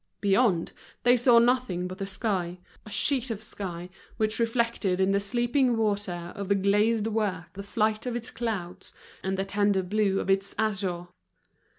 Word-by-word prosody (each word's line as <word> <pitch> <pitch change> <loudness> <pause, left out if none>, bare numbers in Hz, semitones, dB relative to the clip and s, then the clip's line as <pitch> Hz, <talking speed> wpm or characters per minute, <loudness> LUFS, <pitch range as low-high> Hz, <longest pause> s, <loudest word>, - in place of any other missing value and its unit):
Beyond, 195 -3 +2 0.3
they 245 +1 +6
saw 245 0 +5
nothing 235 -7 +2
but 185 +2 -8
the 195 - -3
sky, 190 -3 -2 0.3
a - - -8
sheet 260 +3 +1
of 220 -2 -4
sky, 180 -4 -6 0.3
which 215 +1 0
reflected 230 -5 0
in 190 +1 +3
the 200 - +3
sleeping 240 +4 +1
water 200 -5 -2
of 200 -1 -5
the 200 - +4
glazed 205 +3 +2
work 205 -6 -2
the 200 - -7
flight 215 +3 -1
of 245 - -2
its 235 -1 -4
clouds 210 -7 -5 0.3
and 190 0 -2
the 195 - -1
tender 200 -1 +1
blue 195 +1 +1
of - - -3
its 195 0 +1
azure. 190 -5 -1
205 Hz, 170 wpm, -27 LUFS, 190-230 Hz, 0.3 s, they